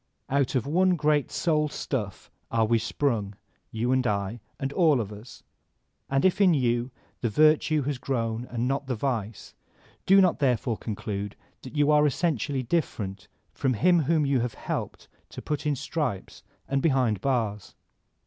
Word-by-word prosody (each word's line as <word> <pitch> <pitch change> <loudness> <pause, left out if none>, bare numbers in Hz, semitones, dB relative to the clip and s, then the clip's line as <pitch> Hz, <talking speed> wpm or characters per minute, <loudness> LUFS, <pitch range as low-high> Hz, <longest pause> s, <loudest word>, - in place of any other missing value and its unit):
Out 140 0 +1
of 125 - +1
one 180 +5 +3
great 150 -3 +1
soul 150 -3 +1
stuff 110 -9 -4 0.2
are 115 -1 +2
we 115 +1 +2
sprung, 110 -4 -1 0.3
you 115 +3 -1
and 130 -1 +2
I 100 +2 -2 0.2
and 135 +1 -3
all 155 -6 +4
of 105 -2 -4
us; 105 +4 -12 0.7
and 135 +3 +1
if 185 +2 +3
in 180 -4 +5
you 120 -2 +1 0.3
the 120 - -1
virtue 155 +3 +3
has 140 -1 -3
grown 115 -3 -2
and 120 0 -2
not 135 +1 -1
the 130 - -1
vice, 115 -4 -3 0.5
do 195 +1 +7
not 185 -5 +3
therefore 125 -4 +1
conclude 105 -2 -5 0.3
that 130 - -10
you 145 0 +3
are 150 0 +5
essentially 145 -3 -1
different 110 - -2 0.3
from 130 -2 0
him 175 - +4
whom 155 0 +2
you 135 -2 +2
have 120 0 -2
helped - - -5 0.2
to - - -9
put 150 0 -3
in 145 - +1
stripes 135 - -4 0.3
and 135 0 0
behind 130 - +2
bars. 110 -7 -1
130 Hz, 165 wpm, -26 LUFS, 115-150 Hz, 0.7 s, do